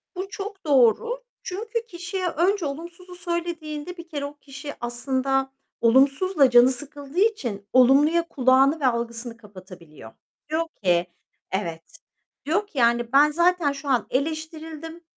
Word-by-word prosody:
Bu 380 +2 -5
çok 395 -2 -7
doğru. 295 - +3 0.2
Çünkü 450 +5 -4
kişiye 360 0 -4
önce 360 +2 +1
olumsuzu 345 +5 -7
söylediğinde 340 -1 -4
bir 340 0 -10
kere 285 -2 -4
o 290 +1 -9
kişi 285 +1 -9
aslında 265 +2 -1 0.3
olumsuzla 275 +6 +4
canı 245 +1 +7
sıkıldığı 285 +3 -6
için 245 - 0
olumluya 290 +7 +5
kulağını 270 +2 +3
ve 275 - -1
algısını 235 0 -3
kapatabiliyor. 185 - -13 0.4
Diyor 320 +2 0 0.2
ki, 175 -1 +2 0.4
"Evet." 170 -4 -3 0.6
Diyor 405 +7 0
ki, 300 - -15
yani, 235 -1 +2
"Ben 295 +2 +6
zaten 345 -2 +2
şu 280 0 -7
an 250 -4 +1
eleştirildim, 320 +3 -4
290 Hz, 130 wpm, -24 LUFS, 250-340 Hz, 0.6 s, canı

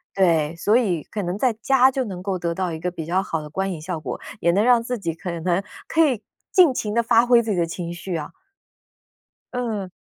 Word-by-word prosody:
对， 165 -4 +2
所 205 +6 +2
以 185 - +1
可 210 - -5
能 180 +2 -3
在 250 0 +2
家 260 +3 +4
就 265 0 -1
能 185 -3 -6
够 190 -2 -2
得 170 -1 -2
到 185 -2 -1
一 160 - -5
个 180 +2 -2
比 165 -3 -6
较 185 +3 +1
好 165 -4 -3
的 150 - -9
观 190 +3 -1
影 165 - -5
效 165 0 -4
果， 125 -5 -5 0.2
也 170 - +2
能 200 +4 +2
让 245 -2 +5
自 245 +1 -3
己 170 -5 -3
可 175 +2 -7
能 175 +3 -1 0.2
可 325 0 +3
以 250 -8 +1 0.3
尽 350 -9 +6
情 210 -4 -2
地 235 - +3
发 230 +1 +5
挥 240 -1 +5
自 220 - -2
己 185 - 0
的 170 -1 +1
情 170 0 -5
绪 175 +1 -5
啊。 150 -2 -4 1.2
嗯。 220 -6 -3
190 Hz, 255 characters per minute, -23 LUFS, 170-230 Hz, 1.2 s, 尽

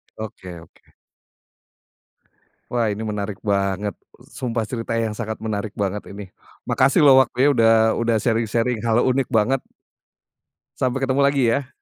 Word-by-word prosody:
Oke 95 -5 -8
oke. 85 - -22 1.8
Wah 115 -3 +1
ini 100 - -5
menarik 100 -1 -4
banget, 100 0 -1 0.4
sumpah 115 -3 -2
cerita 115 -2 -5
yang 110 -1 -3
sangat 110 -1 -5
menarik 105 -2 -4
banget 100 +1 -2
ini 100 +1 -8 0.4
makasih 135 +6 +3
loh 140 -3 +7
waktunya 130 +3 0
udah 115 -1 +4 0.3
udah 115 -1 0
sharing 115 0 +1
sharing 120 -1 0
hal 115 0 +2
unik 130 +1 +1
banget. 120 +4 +2 1.2
Sampai 130 +1 -1
ketemu 135 +1 +1
lagi 140 -2 +2
ya. 130 +3 0
115 Hz, 135 wpm, -21 LUFS, 105-125 Hz, 1.8 s, loh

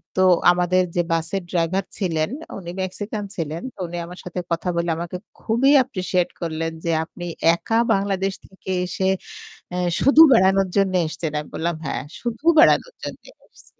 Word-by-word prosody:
তো 185 - +2 0.3
আমাদের 180 +1 +2
যে 175 - +3
বাসের 165 +4 -1
ড্রাইভার 180 +2 0
ছিলেন 165 -4 0 0.3
উনি 175 -3 -8
'মেক্সিকান' 205 +2 -4
ছিলেন। 160 0 -3
তো - - -22
উনি 175 +1 -6
আমার 180 +1 -10
সাথে 180 0 -5
কথা 170 +2 -1
বলে 170 0 0
আমাকে 170 +1 -5 0.3
খুবই 245 +5 +3
অ্যাপ্রিশিয়েট 185 -7 0
করলেন 165 0 -2
যে, 165 - +1
"আপনি 175 +1 -9 0.3
একা 225 +6 -1 0.2
বাংলাদেশ 195 -1 0
থেকে 190 0 -13 0.2
এসে 185 +1 -3 0.7
এ্যা 180 - -1 0.2
শুধু 285 +4 +7
বেড়ানোর 195 -2 +4
জন্য 195 -1 +2
এসছেন?" 160 -1 -4
আমি 150 - -8
বললাম 170 0 -1
"হ্যাঁ, 140 - -3 0.2
শুধু 240 +5 -5
বেড়ানোর 485 +8 +4
জন্যে - - -7 0.2
এসেছি।" - - -22
185 Hz, 160 wpm, -22 LUFS, 170-195 Hz, 0.7 s, শুধু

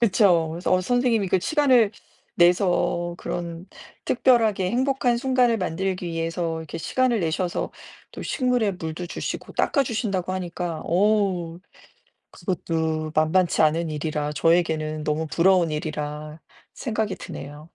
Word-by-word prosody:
그쵸. 190 -7 +3
그래서 170 +3 -2
어 185 - +4
선생님이 235 -1 +1
그 185 - +2
시간을 255 - +3 0.5
내서 175 -1 +2
그런 170 0 -5 0.4
특별하게 225 -7 +2
행복한 255 -1 +1
순간을 250 -2 +2
만들기 185 0 -2
위해서 165 0 -2
이렇게 160 +1 -7
시간을 255 +6 +1
내셔서 170 +2 -2 0.4
또 - - -7
식물에 250 -6 +1
물도 170 0 -5
주시고 - - -5
닦아주신다고 215 - 0
하니까 175 -3 -4
어우 185 -3 +1 0.7
그것도 160 -4 -2
만만치 160 +3 +2
않은 160 +1 +2
일이라 150 -1 -2
저에게는 155 -2 +1
너무 155 +1 -1
부러운 175 0 +3
일이라 150 0 -5 0.3
생각이 215 -4 -2
드네요. 145 +2 -8
175 Hz, 310 characters per minute, -24 LUFS, 160-215 Hz, 0.7 s, 어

